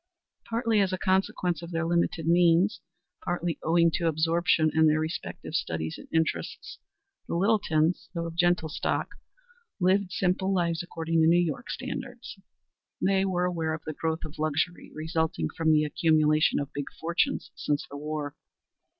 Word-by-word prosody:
Partly 230 -1 +1
as 195 -2 +2
a 185 - -1
consequence 185 -3 0
of 170 - -8
their 165 -1 -1
limited 170 -1 0
means, 175 +4 +4 0.4
partly 175 -2 -2
owing 170 +1 +3
to 170 +1 0
absorption 165 0 +2
in 160 0 +5
their 155 0 +3
respective 160 +1 -5
studies 80 -1 -2
and - - -12
interests, 160 0 -2 0.5
the - - -2
Littletons, 175 -4 +1
though 170 0 -2
of 165 - -5
gentle 175 -1 +2
stock, 160 - -2 0.7
lived 190 +1 +2
simple 190 +1 0
lives 170 -3 +1
according 165 -1 -1
to 160 - +5
New 170 +1 +5
York 165 -5 -2
standards. - - -6 0.6
They 195 0 +2
were 180 -2 0
aware 165 -3 -1
of 155 - -10
the 155 - -4
growth 160 +1 -2
of 155 0 -10
luxury 155 +3 -1
resulting 155 - -1
from 160 -1 +2
the 155 -1 +4
accumulation 155 0 +3
of 140 -1 -5
big 145 -1 -4
fortunes 170 - 0
since 145 -1 -2
the 145 - -10
war. 150 0 -4
165 Hz, 160 wpm, -27 LUFS, 155-180 Hz, 0.7 s, in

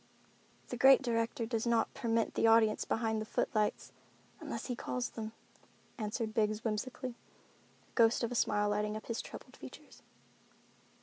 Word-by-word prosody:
"The 245 - -4
Great 270 +2 +7
Director 230 -1 0
does 225 0 -2
not 230 -1 +2
permit 230 -1 0
the - - +3
audience 225 -1 +4
behind 220 -1 0
the - - -4
footlights, 215 -1 -1 0.5
unless - - -5
he 250 - -3
calls 250 +1 -3
them," 220 -1 -5 0.7
answered 220 +1 -2
Biggs 215 0 +1
whimsically, 245 +4 -3 0.7
the - - -31
ghost 230 0 +4
of 235 - -1
a - - -2
smile 210 -3 +2
lighting 210 +1 -1
up 215 - -10
his 230 0 -3
troubled - - -11
features. - - -12
225 Hz, 150 wpm, -33 LUFS, 215-235 Hz, 0.7 s, Great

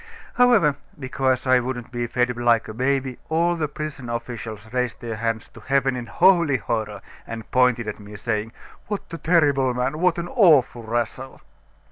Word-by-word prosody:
However, 225 - +4 0.2
because 130 -1 -1
I 130 -1 +5
wouldn't 125 -1 -5
be 120 -1 -2
fed 125 +1 0
like 120 -1 +2
a 110 - -7
baby, 130 +1 -1
all 170 +2 +2
the 160 -3 -1
prison 145 -4 -6
officials 115 -2 -6
raised 125 -2 -1
their 115 -2 -5
hands 115 0 -2
to - - -14
heaven 135 -1 +1
in 120 -1 -5
holy 170 -6 +4
horror, 105 -2 -3 0.2
and 115 -1 -8
pointed 125 -3 +3
at 105 - -5
me, 105 0 -11
saying: 110 +1 -2 0.4
'What 205 -1 -3
a 165 - -6
terrible 145 -7 +2
man! 125 +5 -1
What 180 -1 +2
an 170 0 -3
awful 155 - +4
rascal! 120 +3 -4
125 Hz, 170 wpm, -23 LUFS, 115-145 Hz, 0.4 s, I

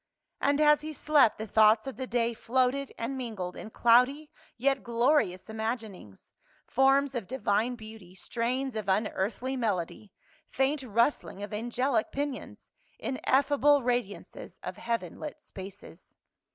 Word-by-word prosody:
And 285 +1 +2
as 300 -1 +5
he 310 0 -6
slept, 295 -6 +3
the 220 - -4
thoughts 215 +1 +4
of 270 - -5
the 260 0 -5
day 235 -1 0
floated 260 +4 0
and 235 +4 -3
mingled 215 -8 -5
in - - -8
cloudy 250 +7 +3 0.3
yet 270 +2 +1
glorious 235 -5 +1
imaginings, 220 - -6 0.3
forms 270 +1 +3
of 235 -7 -4
divine 230 -1 0
beauty, 215 -5 -12
strains 245 +7 -2
of 215 -3 -3
unearthly 210 +5 -1
melody, 210 -4 -2 0.4
faint 270 +2 0
rusthng 235 -3 0
of 210 - -7
angelic 240 +2 0
pinions, 285 -1 -5 0.3
in 260 - -4
effable 285 0 +4
radiances 240 -5 -3
of - - -6
heaven 230 -7 -3
lit 300 0 -7
spaces. 190 - -12
240 Hz, 135 wpm, -29 LUFS, 215-270 Hz, 0.4 s, as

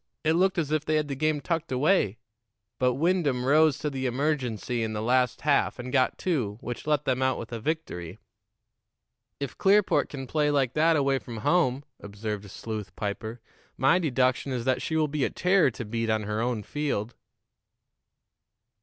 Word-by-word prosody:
It 160 0 +3
looked 185 +3 +2
as 155 -3 -1
if 155 -1 +1
they 155 0 0
had 150 -1 0
the 140 - -2
game 155 +1 0
tucked 165 -2 -2
away; 130 - +2 0.6
but 125 -1 +2
Wyndham 150 -5 +1
rose 155 +2 +4
to 150 - -2
the 130 -1 -2
emergency 125 -3 -1
in 110 -1 -2
the 105 - -3
last 125 +2 +2
half 145 -1 +2
and 125 0 -7
got 130 -2 +2
two, 125 - -1
which 120 +5 -6
let 150 -1 +1
them 130 -1 0
out 130 -1 +2
with 115 - -7
a 115 - -4
victory." 110 - -4 1.2
"If 140 -2 -5
Clearport 200 +1 +3
can 135 -2 -6
play 150 +3 +1
like 135 -4 +1
that 160 +2 +4
away 140 -2 +2
from 115 0 -8
home," 140 -6 +2 0.2
observed 105 0 -6
Sleuth 110 0 -6
Piper, 110 +3 -4 0.4
"my 135 +8 +4
deduction 130 -4 +1
is 125 -2 -3
that 130 -1 +1
she 160 - -2
will 155 -1 +2
be 145 -1 -2
a - - +1
terror 180 -4 +3
to 120 -1 -7
beat 115 +1 -2
on 110 -1 +1
her 105 +1 -2
own 120 -3 -1
field." 130 -6 -2
130 Hz, 180 wpm, -27 LUFS, 115-155 Hz, 1.2 s, rose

